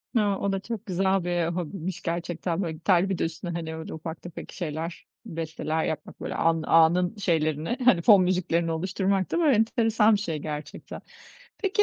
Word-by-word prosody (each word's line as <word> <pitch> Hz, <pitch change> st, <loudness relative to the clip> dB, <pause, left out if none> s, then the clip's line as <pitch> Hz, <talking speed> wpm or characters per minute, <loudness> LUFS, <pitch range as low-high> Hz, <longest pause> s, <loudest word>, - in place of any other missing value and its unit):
He, -, -, +5 dB
o 200 Hz, -1 st, 0 dB
da 195 Hz, -, -1 dB
çok 225 Hz, +2 st, -6 dB
güzel 190 Hz, 0 st, +1 dB
bir 175 Hz, -1 st, 0 dB
hobiymiş 180 Hz, +1 st, -4 dB
gerçekten. 170 Hz, +1 st, -2 dB
Böyle 165 Hz, -4 st, -2 dB
gitarla 175 Hz, +3 st, +2 dB
bir 190 Hz, -, -1 dB
de -, -, -1 dB
üstüne, 165 Hz, +2 st, -4 dB
hani, 165 Hz, -1 st, -4 dB
öyle 160 Hz, 0 st, -7 dB
ufak 160 Hz, 0 st, -7 dB
tefek 175 Hz, -2 st, -9 dB
şeyler, 165 Hz, -1 st, -5 dB, 0.2 s
besteler 160 Hz, -1 st, -3 dB
yapmak 160 Hz, -, -5 dB
böyle -, -, -4 dB
an 165 Hz, -1 st, +2 dB
anın 175 Hz, +4 st, +4 dB
şeylerini 160 Hz, -, 0 dB
hani 190 Hz, -9 st, +6 dB
fon 200 Hz, 0 st, +7 dB
müziklerini 175 Hz, -2 st, +1 dB
oluşturmak 190 Hz, +3 st, 0 dB
da 330 Hz, -4 st, +3 dB
enteresan 225 Hz, -1 st, +3 dB
bir -, -, -1 dB
şey 165 Hz, -7 st, -3 dB
gerçekten. 150 Hz, 0 st, -7 dB, 0.6 s
Peki 400 Hz, +1 st, +2 dB
175 Hz, 175 wpm, -26 LUFS, 165-195 Hz, 0.6 s, fon